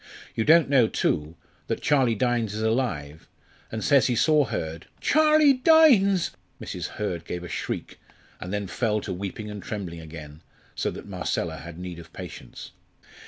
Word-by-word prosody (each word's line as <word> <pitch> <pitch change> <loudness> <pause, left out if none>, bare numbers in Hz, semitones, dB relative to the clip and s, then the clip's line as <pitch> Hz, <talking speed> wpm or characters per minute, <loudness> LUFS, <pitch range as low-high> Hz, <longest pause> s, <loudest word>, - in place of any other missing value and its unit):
You 110 - -1
don't 165 0 +6
know, 135 -5 +4
too, 75 -5 -1 0.3
that - - -3
Charlie 130 -6 +3
Dynes 115 -2 0
is 110 - -3
alive, 110 - -2 0.4
and 110 -1 -4
says 140 -3 +4
he 125 - +1
saw 150 +4 +4
Hurd 80 -6 -5
" - - -34
"Charlie 305 -1 +5
Dynes!" 255 - +5 0.3
Mrs. - - -5
Hurd 90 -6 -3
gave 90 +1 -5
a - - -6
shriek, - - -5 0.4
and 90 - -6
then 100 0 -2
fell 105 +3 0
to 95 - -4
weeping 100 +3 -5
and 105 -1 -7
trembling 95 -6 -5
again, 80 -1 -10 0.3
so - - -1
that - - -8
Marcella 90 -3 -2
had 80 +4 -9
need 90 -1 -7
of 85 - -13
patience. - - -9
105 Hz, 165 wpm, -25 LUFS, 85-135 Hz, 0.4 s, don't